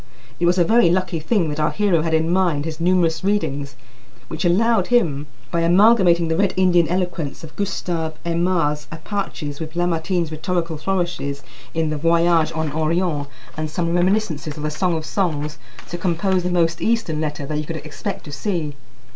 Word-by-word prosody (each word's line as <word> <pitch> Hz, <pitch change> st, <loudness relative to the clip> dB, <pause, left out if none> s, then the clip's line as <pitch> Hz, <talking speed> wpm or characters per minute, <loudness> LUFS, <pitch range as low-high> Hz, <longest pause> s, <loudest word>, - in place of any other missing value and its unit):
It 170 Hz, -, +2 dB
was 180 Hz, +1 st, +3 dB
a 175 Hz, -, +5 dB
very 220 Hz, 0 st, +4 dB
lucky 180 Hz, -1 st, 0 dB
thing 175 Hz, +2 st, +1 dB
that 150 Hz, +1 st, -4 dB
our 150 Hz, -, +2 dB
hero 200 Hz, -6 st, +2 dB
had 160 Hz, 0 st, +1 dB
in 160 Hz, 0 st, +1 dB
mind 175 Hz, -6 st, +1 dB
his 160 Hz, -1 st, -5 dB
numerous 170 Hz, -2 st, +2 dB
readings, 145 Hz, -9 st, -1 dB, 0.5 s
which 160 Hz, 0 st, -4 dB
allowed 225 Hz, +6 st, +3 dB
him, 155 Hz, -, +1 dB, 0.2 s
by 170 Hz, -, +1 dB
amalgamating 175 Hz, -1 st, +5 dB
the 160 Hz, -, 0 dB
Red 195 Hz, +2 st, +1 dB
Indian 175 Hz, -3 st, +4 dB
eloquence 175 Hz, -4 st, -2 dB
of 160 Hz, -, -10 dB
Gustave 175 Hz, -5 st, -2 dB
Aimard's 165 Hz, -3 st, 0 dB
Apaches 160 Hz, -4 st, -4 dB
with 160 Hz, 0 st, -6 dB
Lamartine's 175 Hz, -1 st, 0 dB
rhetorical 165 Hz, 0 st, -2 dB
flourishes 170 Hz, -5 st, -2 dB, 0.3 s
in 160 Hz, -1 st, 0 dB
the 155 Hz, -, -2 dB
"Voyage 165 Hz, +1 st, +3 dB
en 160 Hz, -2 st, -1 dB
Orient," 160 Hz, -1 st, 0 dB, 0.3 s
and 155 Hz, 0 st, -3 dB
some 170 Hz, +1 st, -1 dB
reminiscences 175 Hz, -5 st, 0 dB
of 150 Hz, -, -6 dB
the 150 Hz, -, -1 dB
"Song 170 Hz, +2 st, 0 dB
of 155 Hz, -, -5 dB
Songs," 150 Hz, -6 st, -2 dB, 0.3 s
to 175 Hz, -, -5 dB
compose 185 Hz, +2 st, +1 dB
the 180 Hz, -, -2 dB
most 170 Hz, -2 st, +1 dB
Eastern 220 Hz, -10 st, 0 dB
letter 150 Hz, -2 st, -3 dB
that 150 Hz, +1 st, -2 dB
you 150 Hz, -, -3 dB
could 165 Hz, -, -4 dB
expect 150 Hz, -1 st, -6 dB
to 145 Hz, -, -9 dB
see. 155 Hz, -1 st, -2 dB
170 Hz, 180 wpm, -21 LUFS, 155-180 Hz, 0.5 s, a